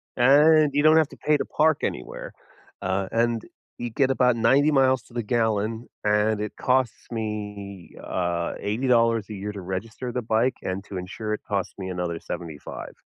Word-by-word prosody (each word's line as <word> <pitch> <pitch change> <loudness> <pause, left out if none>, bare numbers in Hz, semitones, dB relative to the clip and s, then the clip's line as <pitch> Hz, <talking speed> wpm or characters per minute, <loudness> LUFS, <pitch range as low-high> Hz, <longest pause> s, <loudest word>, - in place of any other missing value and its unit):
and 150 +4 +6
you 145 +1 +2
don't 155 +1 +7
have 155 -3 +4
to - - -13
pay 150 0 +2
to - - -1
park 155 -1 +2
anywhere, - - -4 0.5
uh, 95 +1 0
and 115 0 +1 0.4
you 120 - -3
get 135 +4 +1
about 125 -2 +3
90 130 +6 +4
miles 130 -3 +3
to - - -20
the 120 - -1
gallon, 110 0 0 0.2
and 105 0 +2
it 105 -1 -4
costs 130 -2 0
me, 105 -4 -5
uh, 85 -1 -1
$80 115 0 +2
a - - -4
year 100 +1 -4
to 100 -2 -7
register 110 +7 -5
the 125 +1 -2
bike, 115 +3 +1
and 95 +1 -3
to 100 - -7
insure 100 +4 -4
it - - -4
costs 100 -3 -2
me 95 -1 -4
another 90 -2 -3
$75. 80 -5 -7
110 Hz, 180 wpm, -25 LUFS, 100-130 Hz, 0.5 s, don't